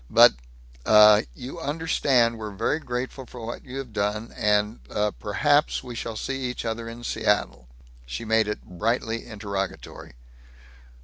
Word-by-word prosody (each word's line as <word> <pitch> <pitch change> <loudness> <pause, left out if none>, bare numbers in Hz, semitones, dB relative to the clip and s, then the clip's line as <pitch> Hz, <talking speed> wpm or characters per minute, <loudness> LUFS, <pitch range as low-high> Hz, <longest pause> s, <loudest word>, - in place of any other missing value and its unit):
But, - - +8 0.5
uh, 105 +2 +7
you 135 +7 -8
understand 140 -7 +1
we're 110 -1 -5
very 115 +9 0
grateful 125 -1 -5
for 120 -2 -9
what 120 - -6
you 130 +1 -8
have 130 -5 -6
done 105 +2 -2
and, 105 +2 +1
uh, 105 0 0
perhaps 145 +11 +1
we 125 -2 -7
shall 115 -1 -5
see 135 +5 -3
each 125 -1 -4
other 115 0 -3
in 120 +1 -9
Seattle?" 105 - 0 0.4
She 60 - -5
made 110 -1 +3
it 105 - -4
brightly 115 +5 -2
interrogatory. 100 - -5
115 Hz, 145 wpm, -25 LUFS, 105-125 Hz, 0.5 s, But